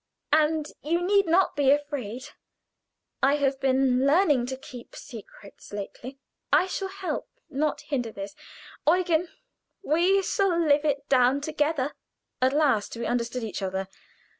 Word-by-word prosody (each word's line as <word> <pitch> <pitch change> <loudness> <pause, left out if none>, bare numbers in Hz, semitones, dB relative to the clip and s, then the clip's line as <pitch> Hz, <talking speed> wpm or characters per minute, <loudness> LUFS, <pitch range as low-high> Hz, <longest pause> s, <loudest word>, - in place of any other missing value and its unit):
And 310 0 +3 0.2
you 335 +3 0
need 395 +2 +3
not 355 +3 +3
be 285 -2 +3
afraid. 280 -3 -1 0.9
I 275 +2 +4
have 275 -2 0
been 265 -1 +2
learning 290 -6 +3
to 260 0 -4
keep 250 -2 -11
secrets 210 -3 -12
lately. 220 +6 -7 0.3
I - - +5
shall 385 +1 -3
help, 385 -1 -5 0.2
not 295 +1 -1
hinder 245 -6 -3
you. 195 0 -4 0.6
Eugen, 350 -1 +1 0.5
we 370 +5 +3 0.2
will 380 -4 +3
live 290 +1 +4
it 280 -1 -1
down 255 +1 +4
together." 295 -2 -1 0.5
At 260 +1 +4
last 275 -8 +1
we 235 - -3
understood 240 +1 -2
each 215 -3 -4
other. 190 0 -3
280 Hz, 140 wpm, -26 LUFS, 250-320 Hz, 0.9 s, I